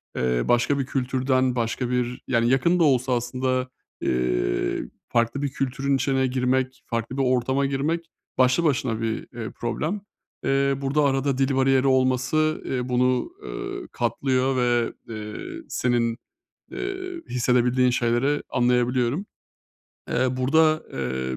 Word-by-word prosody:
eee, 60 -1 +1
başka 120 +4 +2
bir 135 - 0
kültürden 130 -1 0
başka 120 +1 -1
bir, 125 0 -1
yani, 120 -1 +2
yakın 170 +7 +3
da - - +5
olsa 130 -3 +3
aslında, 130 +1 -1 0.3
eee, 60 -1 0 0.3
farklı 120 +4 +1
bir 140 - 0
kültürün 135 +1 -1
içine 135 -1 +1
girmek, 130 +1 0
farklı 115 +3 -3
bir 135 - +2
ortama 130 +2 +1
girmek, 150 +5 -1 0.3
başlı 130 +5 +4
başına 130 -7 0
bir, 110 -1 0 0.2
eee, 115 -2 -4
problem. 155 - -2 0.4
Eee, 135 0 +2
burada 140 +2 +1
arada 135 -1 +1
dil 135 0 +1
bariyeri 135 0 +3
olması, 130 +4 +2
eee, 125 -1 -2
bunu, 125 - +1
eee, 385 -2 -6
katlıyor 130 +2 0
ve, 120 -2 +1 0.2
eee, 105 -1 -6 0.3
senin, 120 -2 0 0.5
eee, 370 -2 -5
hissedebildiğin 125 +1 +2
şeyleri 120 +4 +1
anlayabiliyorum. 125 - +1 0.9
Eee, 130 0 +1
burada, 155 +4 +3
eee, 65 -1 -3
130 Hz, 130 wpm, -24 LUFS, 120-135 Hz, 0.9 s, da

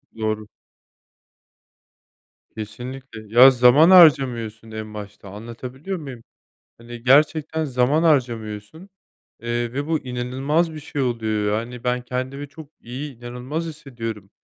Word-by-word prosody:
Doğru. 110 -1 -3 2.1
Kesinlikle. 120 +2 -8 0.2
Ya, 135 +1 +11
zaman 125 +7 +6
harcamıyorsun 120 - +5
en 110 -1 -7
başta 105 -1 -9
anlatabiliyor 125 - -7
muyum? 135 -7 -9 0.5
Hani, 120 0 -11
gerçekten 155 +4 +3
zaman 135 +4 +1
harcamıyorsun, 120 - -1 0.5
eee, 120 0 -2
ve 140 +2 -3
bu 160 -1 +1
inanılmaz 135 +6 -1
bir 155 - -7
şey 145 -1 -4
oluyor 110 -4 0
yani 120 +1 -8
ben 125 0 0
kendimi 130 +3 -5
çok 145 +1 -13
iyi 130 +2 -7
inanılmaz 125 +7 -5
hissediyorum. 115 - -7
125 Hz, 110 wpm, -22 LUFS, 115-145 Hz, 2.1 s, Ya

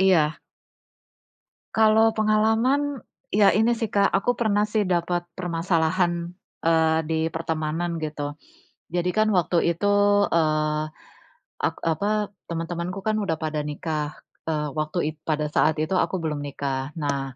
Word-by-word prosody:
Iya. 165 -5 +3 1.4
Kalau 220 0 +5
pengalaman, 225 +6 +2 0.3
ya 200 -1 +4
ini 225 +3 +3
sih, 225 -2 -3
Kak, 200 -1 +4
aku 200 +5 +1
pernah 210 -3 +2
sih 210 -2 0
dapat 175 0 0
permasalahan, 170 0 0 0.3
eee, 160 -1 +3
di 160 0 -1
pertemanan 165 +1 -2
gitu. 150 -2 -4 0.6
Jadi 175 +1 -1
kan 215 +2 +2
waktu 170 -1 +2
itu, 205 +4 +1 0.4
eee, 155 -2 +1 0.8
ak - - 0
apa, 205 +5 0 0.2
teman-temanku 170 +3 -4
kan 215 0 0
udah 195 -6 0
pada 155 -1 -3
nikah, 150 0 -3 0.3
eee, 150 -2 -1
waktu 155 +4 -3 0.2
it 155 - -31
pada 150 -1 0
saat 155 +1 +3
itu 155 +3 -2
aku - - 0
belum 150 -2 -2
nikah. 140 -1 -4
Nah, 140 -4 -2
170 Hz, 130 wpm, -24 LUFS, 155-205 Hz, 1.4 s, Kalau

